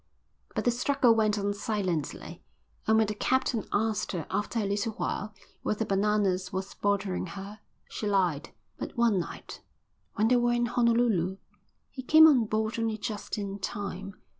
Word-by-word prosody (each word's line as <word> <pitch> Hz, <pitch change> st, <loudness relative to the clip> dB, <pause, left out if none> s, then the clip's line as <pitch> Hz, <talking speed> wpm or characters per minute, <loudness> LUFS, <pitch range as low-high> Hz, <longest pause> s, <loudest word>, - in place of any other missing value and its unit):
But -, -, -1 dB
the 245 Hz, -, +4 dB
struggle 245 Hz, 0 st, +3 dB
went 215 Hz, -2 st, +2 dB
on 205 Hz, 0 st, 0 dB
silently, 200 Hz, -, -3 dB, 0.5 s
and 220 Hz, 0 st, +5 dB
when 220 Hz, -, +4 dB
the 210 Hz, -, -3 dB
captain 255 Hz, 0 st, 0 dB
asked 215 Hz, 0 st, 0 dB
her 170 Hz, -3 st, -3 dB
after 205 Hz, +4 st, -2 dB
a 215 Hz, -, +1 dB
little 205 Hz, +3 st, -1 dB
while 210 Hz, 0 st, -3 dB, 0.3 s
whether 215 Hz, +1 st, -1 dB
Bananas 195 Hz, -2 st, +1 dB
was 190 Hz, +1 st, -4 dB
bothering 200 Hz, -2 st, -1 dB
her, 200 Hz, +4 st, -8 dB, 0.3 s
she 210 Hz, -, -4 dB
lied. 180 Hz, -6 st, +1 dB, 0.3 s
But -, -, -6 dB
one 230 Hz, -5 st, +3 dB
night, 170 Hz, -, -7 dB, 0.5 s
when 220 Hz, 0 st, +2 dB
they 250 Hz, -, +5 dB
were 240 Hz, 0 st, +2 dB
in 240 Hz, 0 st, +1 dB
Honolulu, 230 Hz, -6 st, +2 dB, 0.5 s
he 260 Hz, -, -7 dB
came 315 Hz, +5 st, +7 dB
on 270 Hz, -8 st, +6 dB
board 220 Hz, +1 st, -1 dB
only 225 Hz, -1 st, -1 dB
just 215 Hz, 0 st, -4 dB
in 200 Hz, -1 st, -4 dB
time. 195 Hz, 0 st, -5 dB
210 Hz, 165 wpm, -28 LUFS, 195-230 Hz, 0.5 s, came